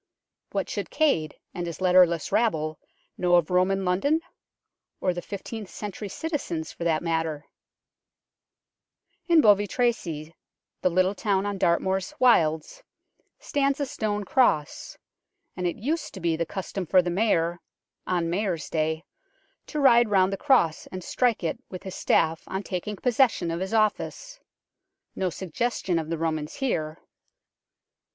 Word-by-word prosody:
What -, -, -1 dB
should -, -, -4 dB
Cade 170 Hz, -, +1 dB, 0.2 s
and 175 Hz, 0 st, -4 dB
his 170 Hz, -, -6 dB
letterless 180 Hz, -3 st, +4 dB
rabble 155 Hz, -9 st, +1 dB, 0.4 s
know 175 Hz, -1 st, +4 dB
of 175 Hz, -1 st, +2 dB
Roman 190 Hz, +1 st, +2 dB
London? 280 Hz, -, +2 dB, 0.8 s
or 180 Hz, -, +1 dB
the 175 Hz, -, -5 dB
fifteenth 205 Hz, +1 st, -7 dB
century 205 Hz, 0 st, -6 dB
citizens, 190 Hz, -, -3 dB
for -, -, -7 dB
that 165 Hz, -1 st, +1 dB
matter? 160 Hz, -3 st, -1 dB, 1.8 s
In 335 Hz, -2 st, +6 dB
Bovey 205 Hz, -3 st, +5 dB
Tracy, 170 Hz, -10 st, -1 dB, 0.5 s
the -, -, +3 dB
little 185 Hz, +2 st, +2 dB
town 200 Hz, -2 st, 0 dB
on 200 Hz, -1 st, -3 dB
Dartmoor's 190 Hz, +1 st, +1 dB
wilds, 170 Hz, -, +3 dB, 0.6 s
stands 280 Hz, 0 st, 0 dB
a 285 Hz, -, 0 dB
stone 215 Hz, -6 st, -2 dB
cross, 190 Hz, -, +1 dB, 0.6 s
and 180 Hz, -1 st, -1 dB
it 170 Hz, -, -2 dB
used 300 Hz, +6 st, -3 dB
to -, -, -7 dB
be 170 Hz, -2 st, +1 dB
the 165 Hz, 0 st, -2 dB
custom 190 Hz, 0 st, -5 dB
for 185 Hz, +1 st, +5 dB
the 175 Hz, -, -2 dB
Mayor, 175 Hz, -4 st, +1 dB, 0.5 s
on 175 Hz, -2 st, 0 dB
Mayor's 175 Hz, -2 st, -2 dB
day, 160 Hz, 0 st, 0 dB, 0.6 s
to 300 Hz, -, -3 dB
ride 240 Hz, -4 st, +6 dB
round 190 Hz, -1 st, +3 dB
the -, -, +1 dB
cross 190 Hz, -, +2 dB
and 185 Hz, -1 st, -7 dB
strike 240 Hz, -2 st, +1 dB
it 165 Hz, -, -2 dB
with 185 Hz, -, -8 dB
his 190 Hz, -, -6 dB
staff 160 Hz, -3 st, +1 dB
on 190 Hz, +1 st, -3 dB
taking 200 Hz, +3 st, -4 dB
possession 235 Hz, -7 st, +2 dB
of 165 Hz, -, -2 dB
his 190 Hz, +1 st, -3 dB
office. 225 Hz, -, -1 dB, 0.8 s
No 190 Hz, -1 st, 0 dB
suggestion 190 Hz, 0 st, -2 dB
of 160 Hz, -1 st, -5 dB
the 165 Hz, -, -1 dB
Romans 155 Hz, -2 st, -2 dB
here. 160 Hz, -, -2 dB
185 Hz, 145 wpm, -26 LUFS, 165-220 Hz, 1.8 s, In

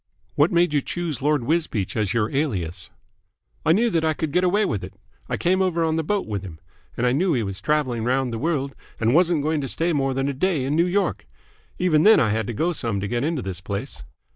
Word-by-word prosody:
"What 145 Hz, +4 st, +3 dB
made 170 Hz, -2 st, +3 dB
you 145 Hz, -, +2 dB
choose 165 Hz, -4 st, -4 dB
Lord 145 Hz, -2 st, +1 dB
Wisbeach 150 Hz, -, -1 dB
as 105 Hz, -4 st, 0 dB
your 110 Hz, -2 st, 0 dB
alias?" 95 Hz, -, -2 dB, 0.7 s
"I 160 Hz, -, +3 dB
knew 225 Hz, +7 st, +3 dB
that 165 Hz, -3 st, +1 dB
I 160 Hz, -1 st, +1 dB
could 155 Hz, -1 st, -3 dB
get 180 Hz, +4 st, +2 dB
away 200 Hz, +4 st, +2 dB
with 105 Hz, -, -2 dB
it. 95 Hz, +1 st, -9 dB, 0.3 s
I -, -, -1 dB
came 185 Hz, +2 st, +1 dB
over 175 Hz, -3 st, +1 dB
on 160 Hz, -1 st, +1 dB
the 160 Hz, -, 0 dB
boat 205 Hz, +5 st, -1 dB
with 105 Hz, -3 st, -3 dB
him, 85 Hz, -5 st, -10 dB, 0.4 s
and 120 Hz, -, 0 dB
I 125 Hz, -, +3 dB
knew 170 Hz, +6 st, +2 dB
he 120 Hz, -5 st, 0 dB
was 100 Hz, -2 st, -5 dB
travelling 130 Hz, -4 st, 0 dB
round 125 Hz, 0 st, 0 dB
the 115 Hz, -, -3 dB
world 140 Hz, -3 st, -1 dB, 0.3 s
and 115 Hz, +1 st, +2 dB
wasn't 170 Hz, -2 st, +3 dB
going 155 Hz, 0 st, 0 dB
to 135 Hz, -, -3 dB
stay 165 Hz, +6 st, 0 dB
more 135 Hz, -2 st, 0 dB
than 135 Hz, +1 st, 0 dB
a 140 Hz, -, -1 dB
day 150 Hz, -1 st, 0 dB
in 140 Hz, +3 st, 0 dB
New 170 Hz, +2 st, +3 dB
York. 190 Hz, -, -1 dB, 0.5 s
Even 170 Hz, -4 st, +3 dB
then 220 Hz, +6 st, +7 dB
I 110 Hz, -, +2 dB
had 110 Hz, +1 st, -1 dB
to 120 Hz, -, -3 dB
go 165 Hz, +10 st, 0 dB
some 115 Hz, -9 st, -2 dB
to 100 Hz, -, -3 dB
get 120 Hz, +3 st, -1 dB
into 155 Hz, -4 st, -1 dB
this 95 Hz, -2 st, -5 dB
place. 100 Hz, +1 st, -5 dB
145 Hz, 245 wpm, -23 LUFS, 115-170 Hz, 0.7 s, then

